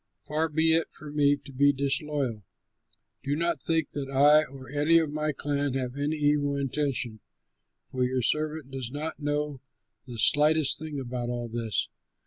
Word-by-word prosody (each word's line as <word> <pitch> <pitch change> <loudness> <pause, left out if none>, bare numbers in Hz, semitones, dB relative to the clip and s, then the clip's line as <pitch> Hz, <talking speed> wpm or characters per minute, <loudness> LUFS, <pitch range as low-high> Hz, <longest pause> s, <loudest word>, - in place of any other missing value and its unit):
Far 155 +2 -1
be 160 +1 +3
it 165 0 +1
from 150 -1 -9
me 145 -1 +4
to 140 0 -13
be 140 +2 +4
disloyal! 140 -4 -1 0.8
Do 140 +1 -1
not 170 -2 -1
think 165 -2 +1
that 140 -2 -4
I 145 +3 +5
or 135 -1 -11
any 150 +4 +3
of 160 -3 +1
my 155 0 -1
clan 145 -1 -1
have 130 -1 -3
any 145 +2 -1
evil 145 -1 +1
intention, 135 -4 -1 0.7
for 130 -1 0
your 125 0 0
servant 155 0 0
does 130 -3 -4
not 150 +3 -5
know 145 -2 -2 0.5
the 120 -2 -7
slightest 145 +3 +4
thing 155 -2 -5
about 120 -2 -4
all 120 -1 -3
this." 115 -2 -1
145 Hz, 165 wpm, -27 LUFS, 130-150 Hz, 0.8 s, I